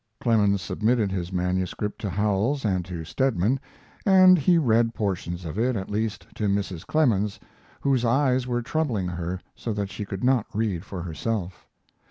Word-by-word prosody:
Clemens 100 -5 +2
submitted 110 +1 +1
his 90 -1 -3
manuscript 90 +3 -2
to 100 - -2
Howells 105 +7 0
and 95 -3 +1
to 85 -2 -6
Stedman, 125 - +1 0.4
and 185 -2 +7
he 175 +4 +4
read 115 -5 +2
portions 90 -4 -3
of 80 +6 -4
it, 125 +2 +1
at 95 -1 -4
least, 110 0 -2
to 105 - -1
Mrs. 100 -4 -2
Clemens, 105 -10 +1 0.4
whose 135 -3 +2
eyes 130 +1 +2
were 120 -1 -1
troubling 120 - -1
her 90 +1 -4 0.2
so 115 - -4
that 100 -1 -3
she - - -5
could 100 0 -6
not 125 -3 +3
read 100 -6 -1
for 90 -4 -6
herself. 90 +2 -4
105 Hz, 165 wpm, -25 LUFS, 95-125 Hz, 0.4 s, and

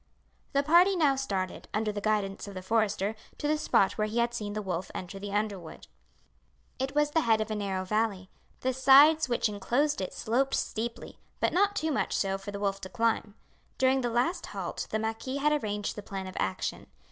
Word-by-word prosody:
The 280 0 +3
party 350 +6 +5
now 295 -6 +3
started, 195 -9 -3
under 215 0 0
the 205 0 -5
guidance 205 -2 -1
of 200 - -8
the 185 - -6
forester, 210 0 +1 0.2
to 295 - -2
the 305 - +3
spot 205 -9 +2
where 215 - +2
he 215 +2 -4
had 235 0 +2
seen 210 -3 -4
the 215 - -2
wolf 180 -1 -3
enter 195 +2 -6
the 200 0 -6
underwood. 200 -5 -3 0.9
It 270 +2 -2
was 295 0 +3
the 320 - +3
head 225 -5 +3
of 215 0 -2
a - - -1
narrow 195 -2 -2
valley. 205 -2 -1 0.3
The 260 0 0
sides 275 +3 +6
which 240 -1 +2
inclosed 235 +8 0
it 185 - -3
sloped 265 +5 +1
steeply, 230 +1 -4 0.2
but - - +1
not 405 +2 +3
too 315 -4 0
much 275 - 0
so 195 -1 0
for 195 +1 -8
the 200 0 -5
wolf 195 -1 -1
to 185 - -7
climb. 230 -2 0 0.4
During 265 0 +3
the 240 - 0
last 250 +10 0
halt - - -5
the - - 0
marquis 225 +5 -3
had 300 +1 +2
arranged 205 -1 -2
the 210 - -6
plan 195 -1 -6
of 185 - -8
action. 95 -1 -2
220 Hz, 205 wpm, -29 LUFS, 200-270 Hz, 0.9 s, sides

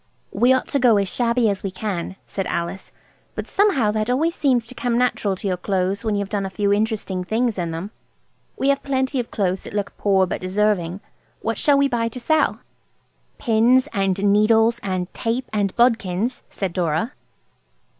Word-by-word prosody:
"We 245 +2 +3
ought 260 - +2
to 280 - +1
go 240 -4 +5
as 200 -1 +1
shabby 235 -1 +2
as 200 -2 -1
we 195 - -3
can," 185 -2 -4
said 195 -2 -4
Alice; 170 +3 -4 0.4
"but - - -4
somehow 305 - +2
that 215 +1 -1
always 310 +7 +1
seems 255 -7 +1
to 230 - -11
come 245 -1 -1
natural 240 -5 +1
to 195 - -5
your 185 -2 0
clothes 190 +1 -1
when 215 -2 0
you've 200 -1 -1
done 205 -2 -1
a 195 - -3
few 200 +1 +1
interesting 205 -3 -1
things 225 +2 0
in 170 -1 -2
them. 165 +5 -5 0.7
We 275 - +1
have 280 0 +2
plenty 265 -1 -1
of 240 - -3
clothes 190 -3 -1
that - - -8
look 205 -1 -2
poor 195 -2 +3
but 175 - -4
deserving. 190 -1 0 0.4
What - - -2
shall 285 -2 +4
we 280 0 +4
buy 235 -3 0
to 250 - -8
sell?" 310 +6 +1 0.8
"Pins 240 +4 +3
and 195 -1 +1 0.2
needles, 225 +2 +4
and 185 -2 -3
tape 235 +3 -2
and 200 -2 +1
bodkins," 230 -1 +1
said 190 -4 -4
Dora. 180 - -1
215 Hz, 185 wpm, -22 LUFS, 190-245 Hz, 0.8 s, go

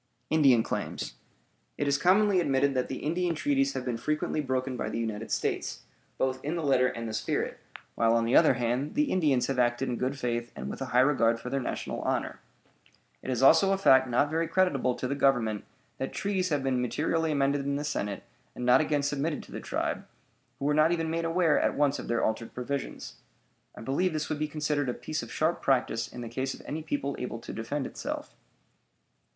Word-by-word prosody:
INDIAN 135 -7 +5
CLAIMS - - -4 0.6
It 145 - -1
is 140 0 +2
commonly 195 +3 +4
admitted 140 -3 +2
that 130 -1 0
the 130 - -6
Indian 170 +2 0
treaties 275 - +1
have 125 - -4
been 120 -2 -1
frequently 150 +4 -1
broken 130 -1 -2
by - - -3
the - - -3
United 110 -1 -3
States, - - -2 0.3
both 130 0 -1
in 150 +4 -2
the 165 - -2
letter 130 -3 +4
and 115 -2 -4
the 110 - -5
spirit, 110 0 -2 0.3
while, 115 0 +3
on 115 0 +2
the 115 - +2
other 155 -5 +6
hand, 125 +4 -1
the 295 -1 +2
Indians 145 -9 +2
have 135 -1 -1
acted 120 +2 +1
in 120 - -2
good 130 +2 -2
faith 120 -2 -2
and 65 +2 -5
with - - -8
a 135 - -2
high 125 0 +4
regard 115 -4 +3
for 125 - -7
their 135 - 0
national 125 - -4
honor. - - -2 0.8
It - - -7
is 130 0 0
also 165 +8 +6
a - - +1
fact 130 -9 +5
not 145 +5 +2
very 165 +1 0
creditable 145 -10 +1
to 130 - -3
the 135 - -1
Government 125 -7 +1 0.3
that 135 - -3
treaties 190 -2 -1
have 145 -3 0
been 130 -2 +1
materially 160 +5 0
amended 140 -1 +1
in 140 0 -1
the 145 - -2
Senate 105 -9 -3 0.3
and 125 - -4
not 125 +3 +6
again 150 -2 0
submitted 145 +2 -1
to - - -16
the - - -5
tribe, - - -3 0.5
who 140 - -4
were 150 - +3
not 155 +2 +4
even 165 -2 0
made 165 0 -1
aware 165 -1 +3
at - - +1
once 145 -1 +2
of - - -7
their 120 -1 0
altered 110 +1 -2
provisions. 135 +3 -5 0.6
I - - -10
believe 160 +8 0
this 155 0 -2
would 155 -1 -2
be 155 - 0
considered 150 -2 -1
a 120 - -2
piece 155 -1 -4
of - - -9
sharp 160 +2 0
practice 125 -4 +1
in 125 - -9
the 120 - -5
case 130 +3 -3
of - - -14
any 155 +2 -4
people 145 -2 -2
able 125 -2 -4
to 115 - -8
defend 135 +5 -3
itself. - - -5
140 Hz, 215 wpm, -28 LUFS, 125-155 Hz, 0.8 s, other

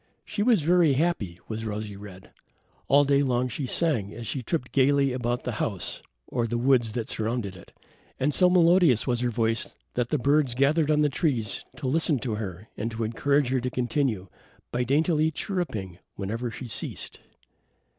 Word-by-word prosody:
She 205 - -3
was 220 -7 +3
very 170 -2 +4
happy, 130 - -1
was 110 0 -4
Rosy 105 -1 -4
red. 100 -2 -12 0.6
All 140 +1 +5
day 140 0 +3
long 125 -2 +1
she 130 +2 -4
sang, 125 -11 +1
as 115 0 -7
she 130 - -3
tripped 125 0 -3
gaily 140 0 +3
about 120 0 -2
the 125 - -2
house 100 -5 -3 0.2
or 120 -2 -1
the 120 +1 -2
woods 120 -3 +2
that 115 -1 -3
surrounded 110 -3 -2
it, 85 - -14 0.5
and 145 +3 +1
so 180 +3 +5
melodious 175 - +4
was 120 -2 0
her 125 0 0
voice 115 -1 -1 0.2
that 125 -1 -1
the 150 - +1
birds 140 -1 +2
gathered 145 +4 +2
on 150 -1 +3
the 150 - +3
trees 130 - -1
to 135 - -4
listen 155 +1 +2
to 120 -3 -3
her 105 -1 -5
and 115 - -3
to 115 0 -4
encourage 140 +4 +1
her 130 0 +1
to 125 +1 -2
continue, 120 -5 -1 0.4
by 125 +1 0
daintily 155 +4 +2
chirruping 135 - -4 0.2
whenever 115 +5 -3
she 125 - -8
ceased. 115 - -2
125 Hz, 180 wpm, -26 LUFS, 115-145 Hz, 0.6 s, All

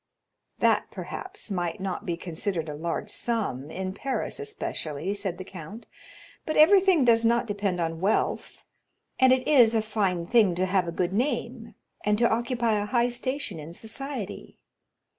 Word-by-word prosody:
"That, - - +2
perhaps, 380 - -7
might 175 -3 -2
not 190 -1 -4
be 170 -1 -1
considered 170 0 -3
a - - -4
large 165 +3 -3
sum, 200 - -2
in 185 +3 -4
Paris 270 - -3
especially," 265 - -4
said 200 -4 -3
the 185 - -6
count; 190 +5 -10 0.6
"but 310 - -2
everything 365 -2 +6
does 230 -1 +5
not 235 +1 +3
depend 200 -4 -2
on 165 -1 -2
wealth, 200 +3 -1 0.5
and 260 0 +6
it 255 0 +2
is 240 -7 +6
a 220 - +3
fine 195 -6 0
thing 210 -3 +4
to 185 +2 +1
have 185 -1 +1
a - - -2
good 180 +2 -1
name, 235 -1 -2 0.3
and 210 0 +2
to 235 +1 +4
occupy 235 -1 +1
a 205 - -3
high 240 +1 +2
station 245 - -3
in 160 +3 -9
society. 230 -1 -6
210 Hz, 160 wpm, -27 LUFS, 180-245 Hz, 0.6 s, everything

